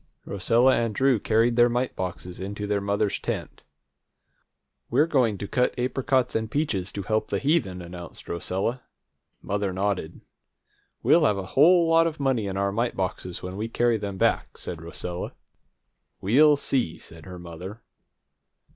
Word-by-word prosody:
Rosella 115 +6 +3
and 115 -3 -1
Drew 135 -4 +3
carried 115 +3 +2
their 120 0 +6
mite 125 +2 -1
boxes 90 -1 -5
into 100 +2 -4
their 105 -1 0
mother's 100 0 0
tent. - - -4 1.3
"We're 140 +6 +4
going 125 -10 +2
to 100 - -5
cut 125 +5 0
apricots 130 0 0
and 110 0 -1
peaches 105 - -1
to 100 - -4
help 110 +1 0
the - - -1
heathen!" 135 - 0
announced 85 -1 -10
Rosella. 95 +8 -2 0.6
Mother 100 -1 -1
nodded. 95 -3 -2 0.8
"We'll - - +5
have 105 -2 +2
a 95 - -4
whole 170 +4 +6
lot 165 0 +5
of 160 -2 -5
money 130 -7 +1
in 95 0 -3
our 100 0 +1
mite 115 +4 -1
boxes 90 -1 -4
when 90 +1 -5
we 110 +2 -2
carry 120 0 +2
them 100 -2 -5
back," - - 0
said 85 -2 -7
Rosella. 85 +1 -5 0.8
"We'll 145 +9 +5
see," 125 - 0
said 80 0 -11
mother. 90 +4 -9
105 Hz, 155 wpm, -25 LUFS, 95-125 Hz, 1.3 s, their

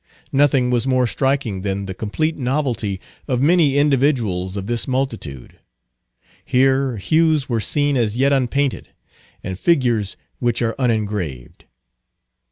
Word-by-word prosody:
Nothing 135 -3 +3
was 125 +1 +1
more 130 -1 +2
striking 130 -5 -1
than 100 0 -2
the 95 - -5
complete 155 - -2
novelty 125 -7 -1 0.3
of 125 -4 0
many 150 -1 +3
individuals 125 -10 +1
of 95 - -4
this 120 +2 -1
multitude. 115 - -4 0.8
Here 130 -1 +2
hues 155 - +2
were 115 -3 -1
seen 145 +6 +1
as 115 -3 0
yet 140 +2 +3
unpainted, 135 +1 0 0.5
and 95 0 -5
figures 120 - +1 0.2
which 120 -2 0
are 115 -1 0
unengraved. 105 - -2
125 Hz, 125 wpm, -20 LUFS, 105-140 Hz, 0.8 s, Nothing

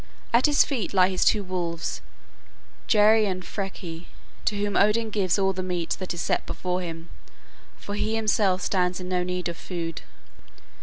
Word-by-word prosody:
At 240 +5 +5
his 295 -1 +5
feet 240 -8 -3
lie 185 0 +6
his 185 -1 +1
two 210 -2 +3
wolves, 175 -3 -3 0.9
Geri 215 0 +5
and 185 -1 -3
Freki, 180 -4 -6 0.4
to 210 - +1
whom 205 0 -1
Odin 215 +2 +3
gives 195 -3 +1
all 195 -1 +2
the 185 - -3
meat 180 -2 -2
that 185 - -4
is 175 -1 -3
set - - 0
before 180 0 -2
him, 165 -1 -7 0.7
for 200 - -7
he 215 +2 -1
himself 205 -4 +2
stands 180 -1 +1
in 180 - -6
no 180 -1 0
need 180 0 -2
of 170 -1 -5
food. 165 - -5
185 Hz, 170 wpm, -25 LUFS, 180-205 Hz, 0.9 s, lie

